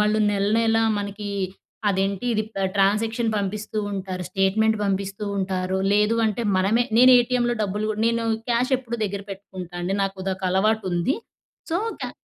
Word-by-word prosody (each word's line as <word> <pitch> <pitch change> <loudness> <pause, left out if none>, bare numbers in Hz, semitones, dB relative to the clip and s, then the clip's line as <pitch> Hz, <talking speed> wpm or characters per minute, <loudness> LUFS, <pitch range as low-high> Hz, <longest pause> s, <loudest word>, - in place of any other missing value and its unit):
వాళ్ళు 210 +1 +2
నెలనెలా 225 +3 +2 0.2
మనకి 205 0 -5 0.6
అదేంటి, 195 +3 -1
ఇది 215 - +1
పె 195 - -1 0.2
ట్రాన్సాక్షన్ 225 +4 +2
పంపిస్తూ 205 +2 -3
ఉంటారు. 185 -1 -4
స్టేట్మెంట్ 210 +4 +2
పంపిస్తూ 195 +1 -2
ఉంటారు. 185 -1 -1 0.2
లేదు 210 +2 +3
అంటే, 220 +2 -1 0.2
మనమే 215 +6 +2
నేను 255 +1 +8
ఏటీఎం‌లో 240 0 +1
డబ్బులు 205 +1 -2
కూడ 210 - -7
నేను 230 0 0 0.3
క్యాష్ 245 +3 +1
ఎప్పుడూ 235 -2 -5
దగ్గర 200 -1 -3
పెట్టుకుంటా 185 -3 -9
అండి. 185 +2 -1
నాకు 195 0 -2
ఉదొక 190 0 -3
అలవాటు 215 +4 +2
ఉంది. 175 +10 +1 0.5
సో, 335 - +1 0.2
క్యా - - -3
205 Hz, 150 wpm, -24 LUFS, 195-225 Hz, 0.6 s, నేను